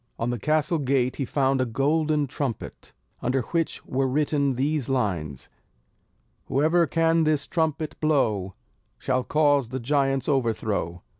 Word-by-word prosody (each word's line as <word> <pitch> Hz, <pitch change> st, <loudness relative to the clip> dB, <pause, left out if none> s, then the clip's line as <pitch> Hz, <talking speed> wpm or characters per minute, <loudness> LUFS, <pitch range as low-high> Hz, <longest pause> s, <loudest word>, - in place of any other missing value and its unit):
On 115 Hz, +1 st, -1 dB
the 120 Hz, -, -3 dB
castle 155 Hz, -, +1 dB
gate 130 Hz, -2 st, 0 dB
he 135 Hz, -, -1 dB
found 135 Hz, 0 st, +1 dB
a -, -, +2 dB
golden 150 Hz, +4 st, +1 dB
trumpet, 135 Hz, -2 st, -5 dB, 0.3 s
under 130 Hz, +2 st, 0 dB
which 165 Hz, +6 st, -2 dB
were 135 Hz, +1 st, 0 dB
written 140 Hz, 0 st, +1 dB
these 140 Hz, +1 st, -1 dB
lines: 90 Hz, -, -2 dB, 1.0 s
"Whoever 160 Hz, +4 st, +2 dB
can 165 Hz, +2 st, +2 dB
this 155 Hz, -2 st, +1 dB
trumpet 160 Hz, -2 st, -2 dB
blow, 110 Hz, -11 st, +1 dB, 0.4 s
Shall 130 Hz, -1 st, -1 dB
cause 145 Hz, -3 st, +2 dB
the 130 Hz, +1 st, -4 dB
giant's 135 Hz, 0 st, 0 dB
overthrow." 110 Hz, -, -1 dB
135 Hz, 135 wpm, -25 LUFS, 125-150 Hz, 1.0 s, a